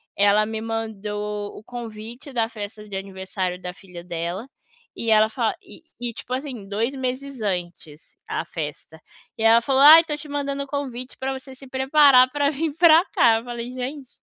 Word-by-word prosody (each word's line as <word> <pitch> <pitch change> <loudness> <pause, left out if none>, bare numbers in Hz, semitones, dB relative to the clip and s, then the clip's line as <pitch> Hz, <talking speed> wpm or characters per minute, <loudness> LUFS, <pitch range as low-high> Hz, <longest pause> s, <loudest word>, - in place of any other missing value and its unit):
ela 205 +1 +4
me 220 0 -4
mandou 210 -2 -4
o - - -11
convite 235 +2 -8
da 230 -2 +1
festa 210 -1 -8
de 195 - -7
aniversário 190 -1 -4
da 180 -1 -6
filha 180 -2 -12
dela, 175 +6 -4 0.5
e 230 - -2
ela 215 0 +5
fala 230 -2 -1
e 370 -4 -14 0.2
e, 240 - -2
tipo 250 - -7
assim, 255 -7 -5
2 225 +6 -1
meses 260 -1 -4
antes, 175 -5 -5
a - - -2
festa. 160 0 -7 0.4
E 220 - -3
ela 230 +1 +6
falou: 270 +3 +2
"Ai, 315 +3 +10
tô 300 -2 -4
te 300 0 -10
mandando 280 -1 -2
o - - -11
convite 265 -3 -5
pra 265 0 -2
você 265 0 -8
se 270 +1 -13
preparar 265 -1 +6
pra 285 0 +1
vir 305 0 -2
pra 335 +1 +7
cá". 225 -2 +5
Eu 230 - -7
falei: 240 0 -6
"Gente, 255 +1 -6
230 Hz, 185 wpm, -23 LUFS, 205-270 Hz, 0.5 s, Ai